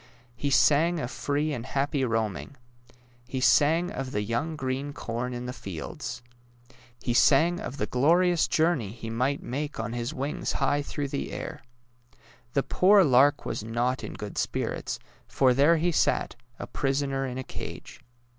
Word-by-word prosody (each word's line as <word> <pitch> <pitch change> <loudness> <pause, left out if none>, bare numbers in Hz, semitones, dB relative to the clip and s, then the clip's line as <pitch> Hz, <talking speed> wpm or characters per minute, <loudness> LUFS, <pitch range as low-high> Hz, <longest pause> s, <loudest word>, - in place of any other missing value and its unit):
He 140 +3 -2
sang 155 +5 +4
of 125 - -4
free 145 +2 -1
and 120 -4 -4
happy 140 +1 -1
roaming. 115 +2 -2 0.7
He 130 0 -3
sang 160 +7 +4
of 135 -9 -4
the 105 - 0
young 120 +9 -2
green 135 +1 -3
corn 125 -3 -4
in 120 0 -5
the 125 - -4
fields. 120 +4 -6 0.8
He 120 - 0
sang 160 +8 +4
of 135 - -6
the - - 0
glorious 170 +5 +3
journey 155 - +1
he 115 -1 -7
might 130 +5 0
make 145 +2 -4
on 115 +1 -3
his 120 +2 -3
wings 140 0 -3
high 145 +1 +1
through 145 0 -4
the 140 - -3
air. - - -6 0.9
The 140 - +2
poor 195 +1 +5
lark 140 0 +4
was - - -3
not 120 +3 -1
in - - -6
good 105 -1 -5
spirits, - - -2 0.3
for 130 -2 +3
there 145 +6 +5
he 175 +2 +1
sat, - - +1 0.2
a - - -5
prisoner 135 0 -1
in 125 0 -5
a 130 - -3
cage. - - -8
135 Hz, 165 wpm, -27 LUFS, 120-150 Hz, 0.9 s, poor